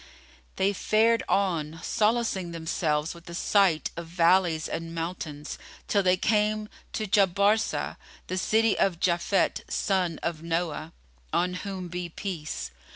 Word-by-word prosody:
They 195 +1 +2
fared 225 +4 +3
on, 165 -5 0
solacing 215 -4 +1
themselves 160 -2 -1
with 170 0 -14
the 170 - -8
sight 190 -4 +2
of 170 0 -6
valleys 170 -1 +3
and 165 0 -5
mountains, 165 -3 -5 0.3
till 200 - +3
they 185 -1 +3
came 210 +1 +1 0.2
to 215 - -1
Jabarsá,[FN#32] 200 +2 +2 0.3
the 185 - -3
city 220 +2 +2
of 180 -4 +2
Japhet 175 +3 +1
son 180 -5 0
of 170 -2 -2
Noah 165 -1 -2 0.4
(on 180 +1 +1
whom 185 0 -5
be 175 0 -4
peace!) 155 - -5
180 Hz, 130 wpm, -27 LUFS, 165-200 Hz, 0.4 s, fared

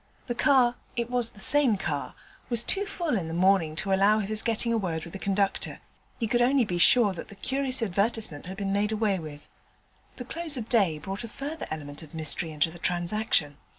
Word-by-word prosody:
The 240 - -2
car 245 -2 +3 0.2
(it 240 0 -2
was 245 -2 +3
the 210 - -16
same 265 -3 +3
car) 150 -6 -3 0.3
was 235 -1 +6
too 400 +8 0
full 340 - -2
in 180 -6 -2
the 165 - -4
morning 180 -3 +3
to 195 +4 -1
allow 200 +3 +4
of 210 -2 -2
his 215 0 +3
getting 230 0 +1
a - - +2
word 165 -5 -3
with 170 - -10
the 195 - -6
conductor: 195 0 -1 0.4
he 230 - 0
could 240 +2 +2
only 255 0 +3
be 175 -4 -3
sure 215 +1 +5
that 175 - -7
the 200 - -12
curious 260 +2 -2
advertisement 200 -5 -1
had 190 +1 -7
been 195 -1 -2
made 205 +1 +1
away 210 -3 0
with. 150 -2 -9 0.7
The 250 - -7
close 320 +1 -1
of 240 - -3
the - - -25
day 195 -10 +3
brought 195 +8 -5
a - - -5
further 290 +8 -6
element 145 -1 -6
of 160 0 -12
mystery 160 +2 0
into 155 +1 0
the 175 - -11
transaction. 175 -4 0
205 Hz, 220 wpm, -27 LUFS, 175-240 Hz, 0.7 s, was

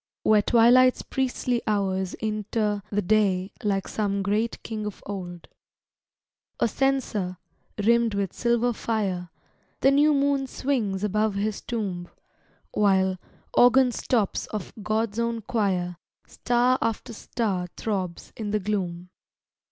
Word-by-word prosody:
Where 215 -1 +5
twilight's 245 +4 +5
priestly 250 -2 -1
hours 190 -3 0
inter 215 -1 -1
The 205 0 0
day 195 -1 +2
like 195 -2 0
some 200 -2 -1
great 210 +4 -1
king 215 -2 -4
of 210 - -8
old, 180 -4 -6 1.1
A - - +3
censer, 225 -8 0 0.4
rimmed 230 +1 +3
with 200 -2 -1
silver 235 0 +1
fire, 195 -6 -2 0.5
The 270 - +5
new 295 +2 +4
moon 275 -1 +1
swings 230 -8 -1
above 210 0 +1
his 205 +1 -2
tomb; 190 -7 -4 0.6
While, 190 -2 +2 0.3
organ 250 +1 +6
stops 225 -4 0
of 210 -4 -6
God's 215 +1 -1
own 235 -1 -1
choir, 185 -6 -1 0.3
Star 245 +1 +1
after 230 +1 -2
star 200 -5 -2
throbs 190 -5 -3
in 215 -2 -4
the 210 +1 +1
gloom. 180 -3 -3
210 Hz, 120 wpm, -25 LUFS, 195-235 Hz, 1.1 s, organ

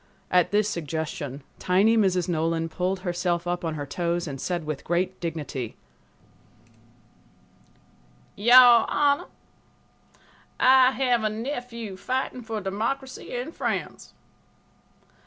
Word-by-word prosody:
At 180 -2 +4
this 210 0 +2
suggestion, 150 -5 -4 0.2
tiny 200 +5 +3
Mrs. 185 -5 +2
Nolan 165 -1 -1
pulled 185 +3 -2
herself 175 -1 -1
up 175 0 -2
on 160 -2 -2
her 145 -1 -4
toes 170 +3 -2
and 135 -2 -6
said 175 -2 -2
with 150 -2 -5
great 175 +2 -1
dignity: 150 -8 -5 2.6
"Your 240 +2 +7
Honor, 285 -1 +2 1.3
I 260 0 +6
have 250 -4 +1
a 215 - +1
nephew 235 -3 -5
fighting 255 +4 -3
for 225 -2 -4
democracy 230 +7 -4
in 245 +5 -4
France. - - -4
190 Hz, 110 wpm, -25 LUFS, 170-240 Hz, 2.6 s, Your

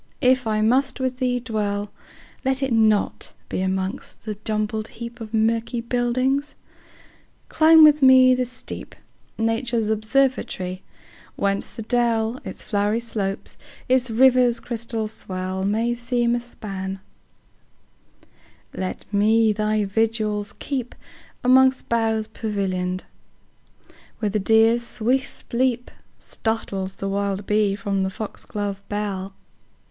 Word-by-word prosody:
if 255 -2 +3
I 215 -1 +1
must 260 +5 +2
with 255 -1 -2
thee 250 -1 +1
dwell, 210 -3 -2 0.5
Let 265 0 0
it 265 -3 0
not 220 -2 +2 0.2
be - - -2
among 190 0 -1 0.2
the 215 -1 -4
jumbled 215 0 -2
heapOf 235 -2 -7
murky 225 +2 +1
buildings; 255 +4 0 0.9
climb 320 0 +7
with 300 -1 +7
me 260 -1 +7
the 250 -1 0
steep,—Nature's 225 -2 -4
observatory—whence 205 -4 -2
the 225 - -6
dell, 235 0 +1
Its - - -7
flowery 210 +1 0
slopes, 205 -4 -4 0.3
its 255 -1 +2
river's 250 0 +4
crystal 230 -2 -3
swell, 185 -3 -4
May 225 +4 +1
seem 240 0 0
a 240 - +1
span; 195 -5 -6 1.7
let 185 -1 -5
me 215 +2 +4
thy 215 0 0
vigils 215 0 0
keep'Mongst 260 0 0
boughs 225 -2 +1
pavillion'd, 190 -4 -2 1.1
where 215 - -1
the 210 +1 0
deer's 225 +3 +4
swift 245 +3 -2
leapStartles 225 -5 -3
the 195 - -4
wild 200 0 -2
bee 210 -1 +2
from 200 -2 -2
the 190 - 0
fox 210 +2 -7
glove 205 -1 -4
bell. 195 -2 -3
225 Hz, 110 wpm, -23 LUFS, 205-245 Hz, 1.7 s, climb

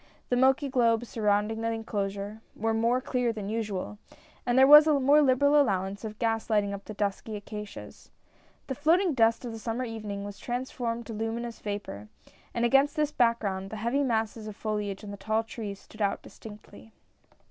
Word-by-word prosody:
The 245 - +2
milky 265 +3 +3
globes 235 -3 +2
surrounding 210 0 0
the 230 0 0
enclosure, 205 -1 -4
were 225 +1 0
more 230 +3 +2
clear 250 -2 0
than 210 -3 -5
usual, 210 -2 -3 0.5
and 245 +1 +2
there 265 - +8
was 300 +2 +9
a 295 -2 +4
more 285 +3 +5
liberal 285 +2 +4
allowance 195 -4 -1
of 215 -1 -6
gas 225 0 -1
lighting 205 -2 +1
up 200 0 -7
the 215 - -8
dusky 205 +2 -2
acacias. 210 0 -9 0.6
The 265 - -3
floating 325 +6 +2
dust 230 -1 +2
of 240 - -4
the 225 - -7
summer 230 +3 -3
evening 210 -3 -5
was 205 0 -8
transformed 240 -1 -3
to 230 - -7
luminous 225 +2 -4
vapor, 205 - -5 0.4
and 235 0 0
against 275 +5 +4
this 300 -2 +1
back 235 -5 +2
ground 195 -2 -3
the 220 - -6
heavy 235 +6 0
masses 225 -4 -1
of 210 - -7
foliage 210 -2 -3
on 205 - -7
the 200 - -7
tall 220 +3 0
trees 215 -3 -7
stood 215 - -13
out 200 -1 0
distinctly. 210 +1 -13
225 Hz, 185 wpm, -28 LUFS, 210-245 Hz, 0.6 s, was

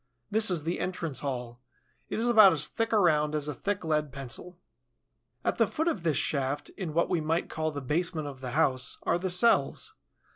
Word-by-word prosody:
This 220 +1 +5
is 170 -5 +1
the 170 +3 -2
entrance 170 -5 -3
hall. 125 -3 -5 0.5
It - - -3
is 230 +2 0
about 215 -6 +7
as 150 -2 0
thick 225 +9 -3
around 155 -8 +3
as 150 -1 0
a 150 - -3
thick 200 +7 -3
lead 150 -2 0
pencil. 140 +6 -6 0.9
At - - 0
the - - +4
foot 320 +2 -2
of 225 - 0
this 160 -5 0
shaft, 140 -1 -1
in 170 -6 -6
what 170 - +2
we 175 -3 0
might 165 +2 -1
call 155 0 -1
the 145 -2 -6
basement 155 +3 -1
of 135 -2 -8
the 125 -2 -5
house, 130 -5 +1
are 170 - +1
the 185 +1 -2
cells. 180 -6 +2
160 Hz, 205 wpm, -28 LUFS, 145-180 Hz, 0.9 s, about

